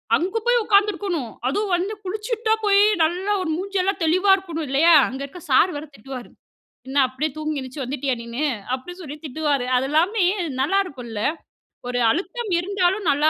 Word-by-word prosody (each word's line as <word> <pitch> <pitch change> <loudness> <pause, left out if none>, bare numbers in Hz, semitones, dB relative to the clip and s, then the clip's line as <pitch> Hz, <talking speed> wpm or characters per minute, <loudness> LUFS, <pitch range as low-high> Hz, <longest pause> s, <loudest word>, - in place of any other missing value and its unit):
அங்க 375 +7 -1
போய் 485 -1 +4
உட்கார்ந்திருக்கணும். 400 - +1 0.2
அதுவும் 395 +8 0
வந்து 375 +5 -2
குளிச்சிட்டு 435 +4 -4
தான் 440 0 +2
போய் 400 0 +5 0.2
நல்லா 360 +5 0
ஒரு 340 - -3
மூஞ்செல்லாம் 390 0 -1
தெளிவா 370 +5 +3
இருக்கணும், 330 -5 -5
இல்லையா? 320 +5 +5
அங்க 265 +1 -6
இருக்க 350 +6 -11
சார் 345 +8 +5
வேற 295 - -6
திட்டுவாரு, 255 +2 -8 0.6
"என்ன 270 - -6
அப்படியே 270 +5 -2
தூங்கி 310 -1 -2
எந்திருச்சு 260 +1 -6
வந்துட்டியா 265 +1 -2
நீனு?" 235 +6 -2 0.3
அப்படின்னு 355 +8 -8
சொல்லி 295 -2 -8
திட்டுவாரு. 285 -2 -1
அதெல்லாமே 325 - +2 0.4
நல்லா 390 +9 +2
இருக்கும்ல்ல! 240 - -6 0.7
ஒரு 245 0 -1
அழுத்தம் 425 - -3
இருந்தாலும் 385 +1 0
நல்லா 295 +2 +3
335 Hz, 160 wpm, -22 LUFS, 275-390 Hz, 0.7 s, போய்